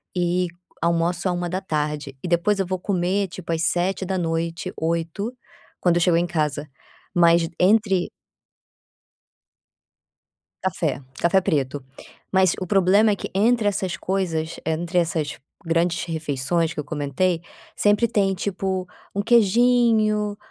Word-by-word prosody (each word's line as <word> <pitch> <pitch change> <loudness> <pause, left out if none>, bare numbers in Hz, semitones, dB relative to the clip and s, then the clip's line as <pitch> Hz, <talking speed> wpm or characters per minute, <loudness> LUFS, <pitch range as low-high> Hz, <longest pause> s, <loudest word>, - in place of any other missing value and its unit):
e 180 0 +1 0.3
almoço 170 +2 +1
a 180 - +1
13h 155 -6 -3
e - - -3
depois 175 +4 +2
eu 190 - +1
vou 185 0 -3
comer 190 +1 0
tipo 175 -1 -7
às 165 0 0
19h, 175 -2 -1
20h 170 +7 -2 0.5
quando 175 -1 +3
eu - - +1
chego 170 -1 +4
em 170 +1 +2
casa, 150 -3 -1 0.5
mas 170 -1 +5
entre 195 -1 +3 2.5
Café, 160 -7 -1 0.2
café 190 +3 +3
preto. 140 -4 -1 0.5
Mas 190 -2 +4
o 185 - -3
problema 200 +2 +4
é 200 - +1
que - - -5
entre 220 +2 +3
essas 190 -3 -1
coisas, 170 -4 -2
entre 170 +2 -2
essas 160 -4 -1 0.3
grandes 170 +1 +1
refeições 160 0 -1
que - - -13
eu 150 - -7
comentei 155 +4 -1 0.4
sempre 205 +3 +3
tem 200 -3 +1
tipo 190 -1 -2 0.3
um 200 - 0
queijinho, 225 -2 +3
175 Hz, 125 wpm, -23 LUFS, 165-195 Hz, 2.5 s, mas